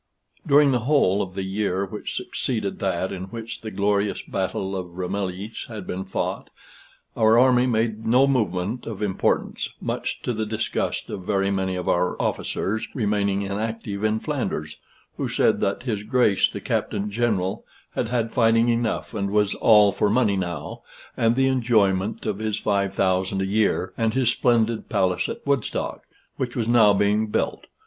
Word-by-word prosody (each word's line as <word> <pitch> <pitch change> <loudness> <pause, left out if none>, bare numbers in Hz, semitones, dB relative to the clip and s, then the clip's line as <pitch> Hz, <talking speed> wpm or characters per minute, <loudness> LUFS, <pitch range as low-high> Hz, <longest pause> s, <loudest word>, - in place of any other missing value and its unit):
During 145 0 +6
the 125 - +2
whole 105 -10 +3
of 95 -1 -5
the 95 - -2
year 95 0 -1
which 105 +2 -6
succeeded 110 -6 -3
that 95 -1 -1
in 95 -1 -5
which 115 +3 -7
the 110 - -5
glorious 100 0 0
battle 95 0 -3
of 90 -2 -6
Ramillies 95 +3 -4
had 110 -5 -7
been 95 +1 -4
fought, 95 - -3 0.7
our 110 0 +4
army 125 0 +5
made 110 -2 0
no 125 +4 +4
movement 110 -4 -1
of 110 -2 -4
importance, 95 -3 0
much - - -3
to 125 - -1
the 110 -1 -2
disgust 110 +2 -2
of - - -5
very 95 +1 0
many 95 -1 -1
of 90 - -4
our 90 +1 +1
officers 110 +3 -1
remaining 100 -4 0
inactive 105 0 -4
in 110 0 +1
Flanders, - - -3 0.4
who - - -2
said - - +2
that 100 +3 -1
his 110 -5 -2
Grace 110 -2 +3
the - - -7
Captain 105 0 -2
General 100 -4 0 0.3
had - - -1
had 115 -1 -1
fighting 115 0 +3
enough, 115 0 -1
and 100 -2 -2
was 105 0 +2
all 105 -3 +5
for 105 - +1
money 110 -2 +2
now, 85 -6 -4 0.3
and 115 0 +2
the 135 +1 +3
enjoyment 110 -6 +1
of 105 -2 -2
his 110 -1 -1
five 100 -2 0
thousand 95 +1 +1
a 95 - 0
year 105 +2 +1
and 115 0 +1
his 130 -3 +3
splendid 115 -2 +1
palace 95 -4 +1
at - - -7
Woodstock, 140 -4 -2 0.3
which 125 -2 -3
was 115 -3 -1
now 115 -3 +6
being 105 +2 +2
built. 105 - -2
105 Hz, 170 wpm, -24 LUFS, 95-115 Hz, 0.7 s, During